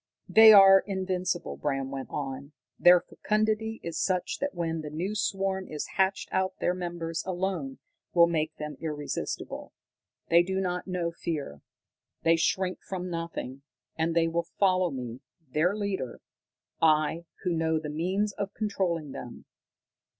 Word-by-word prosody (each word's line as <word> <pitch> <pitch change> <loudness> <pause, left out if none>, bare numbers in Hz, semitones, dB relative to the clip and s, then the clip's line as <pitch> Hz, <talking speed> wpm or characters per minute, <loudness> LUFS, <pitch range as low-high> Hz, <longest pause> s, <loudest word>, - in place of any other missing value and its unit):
"They 220 0 +9
are 195 -2 +9
invincible," 185 -2 -2
Bram 135 -2 -2
went 135 -1 -5
on. 140 0 -5 0.3
"Their 175 0 +7
fecundity 215 +1 -1
is 170 -1 -4
such 185 -2 -1
that 285 0 -2
when 165 -2 -2
the 150 - -6
new 175 +7 -3
swarm 195 -2 -1
is 150 -1 -5
hatched 190 0 +1
out 190 0 0
their 175 - +1
numbers 170 -2 -4
alone 180 -7 -3 0.3
will 170 -1 +6
make 160 -2 -1
them 150 -2 -6
irresistible. 150 -3 -4 0.6
They 170 +1 +7
do 190 +2 -1
not 180 -1 -2
know 180 -2 -1
fear. 150 - -5 0.6
They 165 0 +5
shrink 185 +3 0
from 185 -1 -5
nothing. 165 -6 -5 0.3
And 165 +1 0
they 165 -1 +4
will 170 +1 -1
follow 185 -2 +3
me, 125 -3 -6 0.3
their 175 +6 +2
leader 195 - -3 0.6
I, 160 +1 +3 0.2
who 180 -2 0
know 160 -1 +1
the 155 -1 -4
means 190 +6 -1
of 200 0 -5
controlling 180 -8 -1
them. 120 - -9
170 Hz, 145 wpm, -28 LUFS, 155-190 Hz, 0.6 s, They